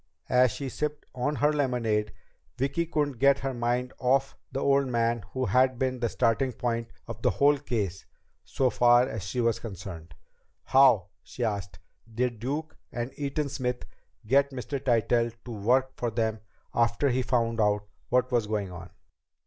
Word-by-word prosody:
As 125 0 +5
she 140 +4 -5
sipped 150 +2 -3
on 135 +4 -1
her 145 +4 +2
lemonade 115 -7 0 0.5
Vicki 140 +6 0
couldn't 145 -6 -1
get 140 +1 +5
her 135 -1 -2
mind 120 +1 -1
off 135 +2 +1 0.2
the 135 - -2
old 140 0 +3
man 115 -2 0
who 130 -1 -1
had 130 0 +3
been 130 0 -1
the 120 -1 0
starting 120 +3 +1
point 115 -1 -2 0.2
of 115 -1 -7
the - - +3
whole 145 0 +3
case 100 -8 -3 0.4
so 130 -2 0
far 120 +1 +5
as 115 -6 -5
she 95 +7 -4
was 115 -1 +1
concerned. 90 -7 -8 0.5
"How," 125 -9 +5
she 125 - -6
asked, 100 -6 -3 0.3
"did 120 0 -1
Duke 150 +7 -3 0.2
and 120 +2 -4
Eaton 145 +1 -2
Smith 125 -2 -3 0.4
get 140 +5 +3
Mr. 135 +1 -5
Tytell 120 -1 +2
to 125 - -7
work 125 +5 +1
for 120 - -2
them 110 -1 -1 0.3
after 120 +4 +2
he 130 +1 +1
found 115 -3 0
out 105 -1 +2 0.3
what 125 +1 +2
was 120 -4 +1
going 105 -3 -2
on?" 90 +1 -9
125 Hz, 165 wpm, -28 LUFS, 115-135 Hz, 0.5 s, As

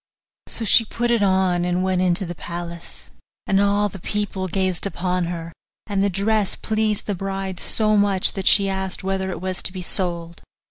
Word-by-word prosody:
So 225 - -2
she 230 - +6
put 235 +2 -2
it 235 -2 +2
on, 190 -3 +2
and 180 +1 0
went 185 -1 +1
into 185 +2 +2
the 175 - -5
palace, 170 0 -8 0.3
and 195 0 +2
all 205 +1 +2
the 195 -1 -9
people 200 0 -3
gazed 185 0 +1
upon 180 -2 -1
her; 170 -1 -5 0.3
and 200 -2 0
the 200 - +2
dress 200 +2 +1
pleased 215 -1 -1
the 205 - -1
bride 195 -1 -4
so 215 -1 +1
much 200 -2 +3
that 195 -2 -3
she 200 -1 +5
asked 190 -1 -3
whether 190 0 -1
it 185 - -4
was 185 -1 -3
to - - -2
be 185 -1 -6
sold. 170 -2 -1
190 Hz, 190 wpm, -22 LUFS, 180-200 Hz, 0.3 s, she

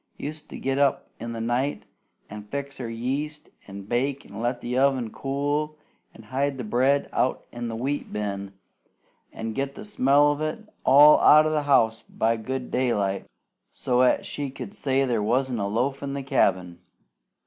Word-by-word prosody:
Used 150 +1 -7
to - - -7
get 135 +1 -1
up 140 -1 +1
in 115 +1 -5
the 115 - -5
night, 120 +5 -1 0.4
an' 105 0 -9
fix 140 +4 -5
her 120 -3 -4
yeast, 135 +6 -4 0.2
an' 100 0 -8
bake, 130 +6 -1
an' 100 +2 -10
let 120 +2 -1
the 125 +1 -4
oven 130 -4 +2
cool, 145 +4 -2 0.4
an' 110 - -13
hide 135 +4 -1
the 125 - -4
bread 130 +6 +2
out 130 - 0
in 120 0 -5
the 115 - -4
wheat 135 +5 -3
bin, 100 -2 -4 0.8
an' 115 0 -5
get 140 +3 -3
the 210 - -8
smell 145 -7 +4
of 145 +1 -4
it 155 +8 -4 0.2
all 145 +3 +8
out 155 +1 +7
o' 155 - +1
the 155 -1 +1
house 115 -5 +4
by 115 +1 +1
good 125 +3 -5
daylight, 105 -6 0 0.4
so's 125 0 +2
'at - - +1
she 145 -1 -4
could 135 +9 -8
say 135 -8 +1
there 120 -4 0
wasn't 125 +3 0
a 100 - -1
loaf 125 +7 -1
in 140 -1 -4
the 140 - -4
cabin. 95 - +1
130 Hz, 180 wpm, -25 LUFS, 115-140 Hz, 0.8 s, all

